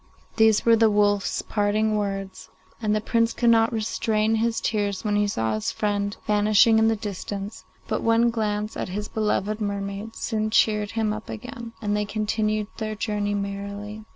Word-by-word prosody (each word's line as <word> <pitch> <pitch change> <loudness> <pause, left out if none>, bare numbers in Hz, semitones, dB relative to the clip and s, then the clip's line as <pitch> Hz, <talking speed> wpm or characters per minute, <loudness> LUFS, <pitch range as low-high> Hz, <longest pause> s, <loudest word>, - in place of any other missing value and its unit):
These 220 -2 +4
were 230 -1 +6
the 225 0 +4
wolf's 205 -1 +1
parting 215 +1 +1
words, 195 -2 -4 0.3
and 215 -1 +1
the 215 - 0
Prince 230 +1 +1
could 235 -1 +3
not 225 0 +4
restrain 220 0 0
his 225 +1 +1
tears 205 -3 -1
when 210 -2 0
he 205 0 +2
saw 110 - -1
his 110 0 -1
friend 205 -1 -1
vanishing 210 +2 +4
in 220 - +4
the 225 - +2
distance; 205 -1 -6 0.2
but - - -1
one 230 +1 +3
glance 215 -1 -2
at - - -4
his 205 +3 -4
beloved 215 0 -1
mermaid 200 +1 -4
soon 215 -1 -2
cheered 210 -1 +2
him 220 -2 0
up 215 0 -8
again, 235 +1 -7
and 205 0 0
they 210 0 0
continued 215 0 -1
on - - -29
their 215 -1 -3
journey 210 -1 -1
merrily. 200 +1 -5
210 Hz, 180 wpm, -24 LUFS, 205-220 Hz, 0.3 s, were